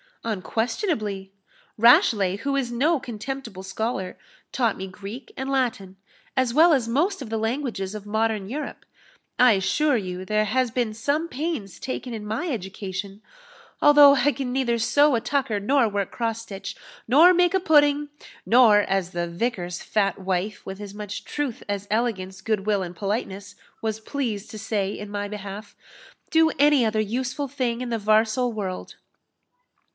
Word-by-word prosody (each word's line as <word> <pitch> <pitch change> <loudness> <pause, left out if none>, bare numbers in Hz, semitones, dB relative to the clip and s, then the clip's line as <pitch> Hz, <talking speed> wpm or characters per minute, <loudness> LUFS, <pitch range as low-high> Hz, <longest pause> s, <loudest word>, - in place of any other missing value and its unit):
"Unquestionably. 220 - -2 0.5
Rashleigh, 210 -4 +5
who 275 +6 -2
is 260 -3 -1
no 290 +7 +2
contemptible 235 -4 -6
scholar, 190 0 -3 0.3
taught 235 -5 0
me 190 - -5
Greek 200 +7 -9
and 265 +1 -4
Latin, 235 -8 -1 0.4
as 255 -2 +2
well 325 +4 +6
as 255 -5 +1
most 310 - 0
of 230 - -9
the 225 - 0
languages 225 -4 -2
of 210 -1 -7
modern 220 -1 -1
Europe. 295 +5 -6 0.5
I 250 -2 +7
assure 245 +9 +2
you 185 -3 -5
there 215 +2 +1
has 255 +4 +1
been 235 -2 -1
some 285 +9 -1
pains 290 - -4
taken 255 -1 -5
in 215 -2 -6
my 225 +12 -2
education, 195 - -5 0.6
although 290 -1 +8
I 285 +2 +3
can 270 -3 -4
neither 250 -2 +1
sew 285 +6 +4
a 230 - 0
tucker, 245 -3 -1
nor 255 +4 +3
work 200 -2 -2
cross 230 -1 -2
stitch, 195 -3 -7 0.3
nor 310 +10 +7
make 355 +1 +3
a - - +4
pudding, 295 -4 +3 0.4
nor 225 -3 +6
as 195 -3 -1
the 175 -1 -2
vicar's 175 -1 -3
fat 200 -3 0
wife, 190 +2 -2
with 190 +1 -7
as 200 -1 -8
much 210 -1 -6
truth 290 -6 -4
as 200 0 -3
elegance, 190 -4 -1
good 210 -1 -1
will, 205 -3 +1
and 175 0 -7
politeness, 200 0 -4 0.3
was 220 -1 -2
pleased 220 -4 -4
to 215 - -7
say 205 -2 -1
in 205 -1 -8
my 205 0 -3
behalf 205 0 -8 0.6
do 320 0 +5
any 290 -4 +5
other 215 0 +1
useful 250 +6 -2
thing 250 -3 -2
in 250 - -4
the 230 -1 -1
varsal 220 +4 +2
world." 195 -4 -5
225 Hz, 160 wpm, -24 LUFS, 200-260 Hz, 0.6 s, although